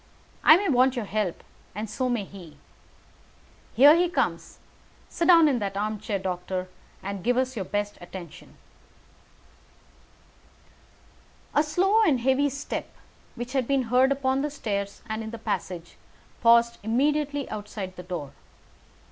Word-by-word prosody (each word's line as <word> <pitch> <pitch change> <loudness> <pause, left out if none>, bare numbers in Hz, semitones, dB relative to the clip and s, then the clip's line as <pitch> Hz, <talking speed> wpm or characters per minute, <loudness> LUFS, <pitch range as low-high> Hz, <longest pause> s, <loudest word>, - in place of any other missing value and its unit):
I 310 - +8
may 400 +2 -1
want 260 -2 +3
your 240 -4 -3
help, 205 -4 -2 0.3
and 215 +2 -4
so 255 +4 -2
may 240 -4 0
he. 180 -6 -12 1.2
Here 285 +5 +8
he 350 +1 +2
comes. - - -2 0.5
Sit 335 - -1
down 335 -3 +7
in 265 -5 +1
that 200 -2 -3
armchair, 215 0 -2
doctor, 185 0 -4 0.4
and 195 -1 -5
give 245 +3 +1
us 260 0 0
your 195 -4 -3
best 205 +1 -3
attention." 175 -1 -11 3.0
A 295 - +4
slow 370 +8 +2
and 300 - +3
heavy 265 +3 +2
step, 280 +2 -5 0.5
which 240 +1 -6
had 260 -3 0
been 265 -4 0
heard 260 +2 +5
upon 270 -1 +1
the 295 - -1
stairs 200 -8 -4
and 220 0 -3
in 220 - -6
the 230 - -7
passage, 180 -5 -5 0.4
paused 235 0 +4
immediately 285 +6 0
outside 205 -3 -6
the 180 - -8
door. 175 -6 -6
235 Hz, 140 wpm, -26 LUFS, 200-275 Hz, 3.0 s, I